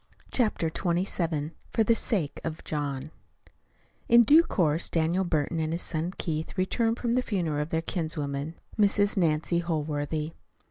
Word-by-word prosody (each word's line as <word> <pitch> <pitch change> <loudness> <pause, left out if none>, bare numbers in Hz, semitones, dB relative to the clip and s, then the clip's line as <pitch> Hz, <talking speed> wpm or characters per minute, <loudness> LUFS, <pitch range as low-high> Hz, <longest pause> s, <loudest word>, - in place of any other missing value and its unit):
CHAPTER 210 -9 +1
XXVII 170 -4 -1 0.2
FOR 225 - +2
THE 230 - +4
SAKE 195 - -1
OF 160 0 -5
JOHN 145 -1 -3 1.0
In 235 0 +8
due 295 +8 +7
course 165 - +1
Daniel 170 +3 +1
Burton 160 -1 0
and 155 0 -1
his 170 - -2
son 165 +2 -2
Keith 160 +1 -3
returned 225 +5 +1
from 235 -1 -1
the 255 - +3
funeral 170 -11 -1
of 150 - -4
their 160 0 -1
kinswoman, 155 -3 -3 0.2
Mrs. 205 0 +3
Nancy 170 -1 +1
Holworthy. 155 -1 -2
165 Hz, 145 wpm, -28 LUFS, 155-195 Hz, 1.0 s, In